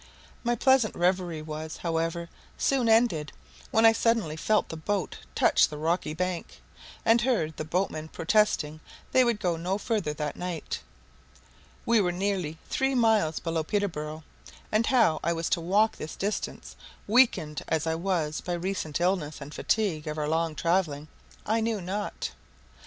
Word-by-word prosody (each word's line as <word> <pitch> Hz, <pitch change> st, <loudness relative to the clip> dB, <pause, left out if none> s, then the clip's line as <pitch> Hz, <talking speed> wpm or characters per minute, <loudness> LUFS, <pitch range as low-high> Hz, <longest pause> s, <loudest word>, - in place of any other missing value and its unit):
My 240 Hz, 0 st, +1 dB
pleasant 260 Hz, -3 st, +3 dB
reverie 175 Hz, -3 st, 0 dB
was, 155 Hz, +1 st, -6 dB
however, 165 Hz, 0 st, -2 dB, 0.3 s
soon 260 Hz, -4 st, +2 dB
ended, 220 Hz, -, +3 dB, 0.4 s
when 225 Hz, -, +4 dB
I 225 Hz, -, +9 dB
suddenly 225 Hz, -9 st, +1 dB
felt 215 Hz, +7 st, +1 dB
the -, -, -5 dB
boat 190 Hz, +2 st, -2 dB, 0.2 s
touch -, -, +5 dB
the 150 Hz, -, -8 dB
rocky 160 Hz, 0 st, -1 dB
bank, 180 Hz, 0 st, -3 dB, 0.5 s
and 230 Hz, +1 st, +5 dB
heard 215 Hz, -, 0 dB
the -, -, -4 dB
boatmen 160 Hz, -2 st, -1 dB
protesting 160 Hz, -4 st, +1 dB, 0.3 s
they 260 Hz, -, +5 dB
would 235 Hz, -3 st, +1 dB
go 175 Hz, -4 st, 0 dB
no 180 Hz, +4 st, -1 dB
further 210 Hz, -8 st, -1 dB
that 150 Hz, 0 st, -3 dB
night. 175 Hz, -3 st, -4 dB, 1.1 s
We 230 Hz, -2 st, +4 dB
were 180 Hz, -2 st, +1 dB
nearly 180 Hz, -4 st, -2 dB
three 270 Hz, 0 st, 0 dB
miles 220 Hz, -10 st, +3 dB
below 165 Hz, -1 st, -1 dB
Peterborough, 160 Hz, -5 st, -2 dB, 0.5 s
and 215 Hz, +2 st, +2 dB
how 230 Hz, -12 st, +4 dB
I 170 Hz, -, +1 dB
was 165 Hz, 0 st, -2 dB
to 170 Hz, -, +1 dB
walk 205 Hz, +6 st, +2 dB
this 155 Hz, -, -6 dB
distance, 205 Hz, +2 st, -4 dB, 0.3 s
weakened 200 Hz, -, +3 dB
as 160 Hz, -1 st, 0 dB
I 160 Hz, -, +1 dB
was 165 Hz, -3 st, -1 dB
by 180 Hz, -, -3 dB
recent 175 Hz, -3 st, -2 dB
illness 175 Hz, -4 st, 0 dB
and 145 Hz, +1 st, -9 dB
fatigue 185 Hz, -9 st, 0 dB
of 150 Hz, 0 st, -3 dB
our 150 Hz, -1 st, -1 dB
long 160 Hz, 0 st, 0 dB
travelling, 160 Hz, -4 st, 0 dB, 0.4 s
I 225 Hz, +1 st, +1 dB
knew 225 Hz, -1 st, 0 dB
not. 195 Hz, +3 st, -4 dB
175 Hz, 155 wpm, -28 LUFS, 155-215 Hz, 1.1 s, I